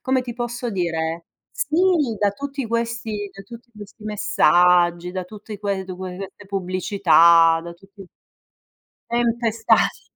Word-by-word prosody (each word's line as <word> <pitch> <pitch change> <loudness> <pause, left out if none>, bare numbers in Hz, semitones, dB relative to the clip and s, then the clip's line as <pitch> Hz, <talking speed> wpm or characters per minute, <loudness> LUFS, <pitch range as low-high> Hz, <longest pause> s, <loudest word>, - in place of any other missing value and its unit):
come 260 -1 +1
ti 240 -2 -7
posso 240 0 -4
dire? 165 -3 -2 0.3
Sì, - - -2 0.4
da 205 0 +2
tutti 280 +2 -5
questi 230 -3 -3
da 195 - -12
tutti 235 +4 -13
questi 210 +1 -13
messaggi, 180 -4 +3
da 185 0 -4
tutti 210 +1 -10
que 200 -2 -2
du 185 -1 -8
que 185 -1 -7
queste 195 +1 -9
pubblicità, 180 -3 +4
da 170 - -7
tutti 195 +2 -16 1.0
Tempestati. 235 -1 +1
200 Hz, 130 wpm, -21 LUFS, 180-230 Hz, 1.0 s, pubblicità